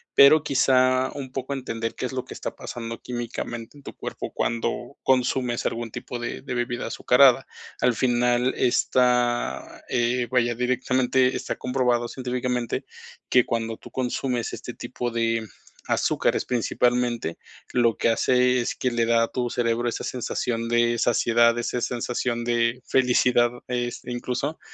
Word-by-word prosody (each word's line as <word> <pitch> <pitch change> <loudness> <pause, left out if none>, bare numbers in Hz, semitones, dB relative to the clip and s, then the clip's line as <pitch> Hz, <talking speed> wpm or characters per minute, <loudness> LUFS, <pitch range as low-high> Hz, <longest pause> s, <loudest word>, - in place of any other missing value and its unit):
pero, 145 +2 +8
quizá, 130 -1 +3
un 135 -3 -6
poco 135 +1 -3
entender 115 -4 -4
qué - - -3
es 125 - -4
lo 130 -1 -2
que - - -9
está - - -6
pasando 115 -1 -7
químicamente 120 +1 -5
en 140 - -16
tu - - -8
cuerpo - - -6
cuando 120 +3 -2
consumes 125 -2 +1
algún 115 -1 -2
tipo 120 - -6
de 120 - -5
de 130 -1 -5
bebida 120 0 -2
azucarada. 130 0 +4 0.4
Al 125 -1 +4
final 125 0 +2
está, 125 -1 +1
eh, 120 0 +1
vaya, 120 -2 +2
directamente 130 +1 +1
está - - -3
comprobado 125 -2 0
científicamente 125 -2 -2 0.4
que 125 -2 +5
cuando 115 -1 -2
tú - - -13
consumes 125 -1 -2
este - - -7
tipo 120 -1 -5
de 115 -1 0 0.4
azúcares - - +1
principalmente, 120 -4 0 0.4
lo 120 -2 +3
que - - +1
hace 125 +2 +3
es - - -2
que 125 - 0
le 120 -1 +1
da 115 0 +3
a - - 0
tu 125 -1 -2
cerebro 120 0 0
esa - - -4
sensación 115 -2 -2
de 120 0 +2
saciedad, 115 0 +3
esa 120 +1 -2
sensación 120 -1 -2
de 120 +1 +1
felicidad, 125 -2 +3 0.2
es, 120 -1 -2
incluso, 125 +5 -3
120 Hz, 150 wpm, -24 LUFS, 120-125 Hz, 0.4 s, pero